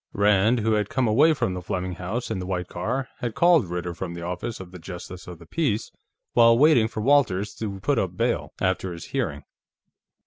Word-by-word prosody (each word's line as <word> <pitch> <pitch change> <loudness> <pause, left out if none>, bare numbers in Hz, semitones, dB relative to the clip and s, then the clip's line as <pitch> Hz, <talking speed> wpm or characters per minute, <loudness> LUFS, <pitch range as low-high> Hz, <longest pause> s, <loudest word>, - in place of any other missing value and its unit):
Rand, 105 +3 +3
who 110 +1 +1
had 105 -1 0
come 130 -2 +1
away 150 +9 +5
from 95 - -1
the 90 - -5
Fleming 90 +1 -3
home 95 +7 -3
in - - -2
the 90 - -5
white 90 -2 -2
car, 125 +10 -3
had 120 -3 -3
called 170 - +4
Ritter 90 0 -3
from 85 0 -6
the 85 - -7
office 90 +6 -4
of 90 -2 -10
the 90 - -10
Justice 90 +1 -9
of 90 -1 -8
the 85 - -14
Peace 115 - -1 0.4
while 115 -1 +6
waiting 135 -5 +5
for 110 - -5
Walters 110 -7 +2
to 100 -3 -4
put 145 +6 +1
up 90 -1 -2
bail, 120 +2 0
after 95 -1 -1
his 85 -2 -8
hearing. 95 - -2
100 Hz, 210 wpm, -25 LUFS, 90-120 Hz, 0.4 s, while